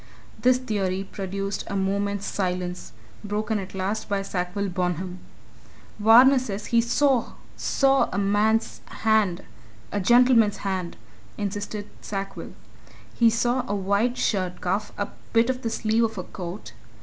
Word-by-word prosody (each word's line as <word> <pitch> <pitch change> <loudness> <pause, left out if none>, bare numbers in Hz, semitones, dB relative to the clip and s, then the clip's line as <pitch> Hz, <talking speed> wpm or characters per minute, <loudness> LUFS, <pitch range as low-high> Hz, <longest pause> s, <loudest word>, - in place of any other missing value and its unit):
This 250 0 +5
theory 195 -6 -2
produced 195 +1 -4
a - - -4
moment's 200 +1 -1
silence 180 -2 -3 0.3
broken 210 +1 -1
at 195 0 -8
last 200 +4 -2
by 200 -1 0
Sackville 195 +1 -2
Bonham. 180 0 -2 0.8
"Varner 245 +6 +7
says 210 -5 -5
he 235 -1 +3
saw 250 +1 +1 0.2
saw! 275 0 +2
a 185 - -3
man's 210 +3 +1 0.2
hand, 215 -5 +2 0.5
a - - -1
gentleman's 235 0 +5
hand," 185 -3 -2 0.4
insisted 205 0 -4
Sackville. 195 -1 -5 0.6
"He 235 -1 +4
saw 240 +3 +1
a 205 - -1
white 200 +5 +1
shirt 185 -6 -1
cuff, 200 +3 -1
a 205 - -2 0.2
bit 230 +2 +4
of 255 0 -6
the 230 - -2
sleeve 225 +1 +1
of 220 -2 -5
a 185 - -3
coat. 180 +2 -8
205 Hz, 135 wpm, -25 LUFS, 190-225 Hz, 0.8 s, Varner